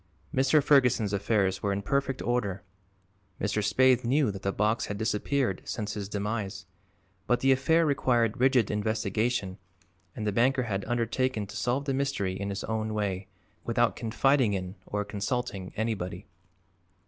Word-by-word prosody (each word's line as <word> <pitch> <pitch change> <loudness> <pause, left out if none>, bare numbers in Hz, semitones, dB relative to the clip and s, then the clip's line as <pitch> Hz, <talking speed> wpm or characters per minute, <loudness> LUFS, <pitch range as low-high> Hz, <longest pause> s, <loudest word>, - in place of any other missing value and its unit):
Mr. 135 +3 +3
Ferguson's 125 -8 +3
affairs 100 -2 +1
were 100 - 0
in 100 +1 -2
perfect 135 +2 -1
order; 100 -7 -1 0.8
Mr. 100 +2 0
Spaythe 125 +4 +4
knew 130 0 +2
that 95 -1 -8
the 100 - 0
box 105 +4 0
had 105 - -4
disappeared 110 0 0
since 105 -1 -4
his 100 -2 -5
demise; 100 -1 -3 0.6
but 125 - +2
the 135 - +4
affair 160 +6 +3
required 120 -6 +1
rigid 130 -4 +3
investigation 105 -1 -1 0.6
and 110 - -4
the 105 - +1
banker 125 +5 +2
had 100 -4 -2
undertaken 120 -1 0
to 100 - -11
solve 130 +3 -1
the 135 - 0
mystery 135 -9 -1
in 100 +1 -4
his 100 0 -4
own 110 -1 -2
way, 95 -2 -2 0.4
without - - +1
confiding 125 0 +2
in 90 -1 -4
or 105 0 -2
consulting 105 -2 -3
anybody. 110 -5 -3
110 Hz, 150 wpm, -28 LUFS, 100-130 Hz, 0.8 s, Spaythe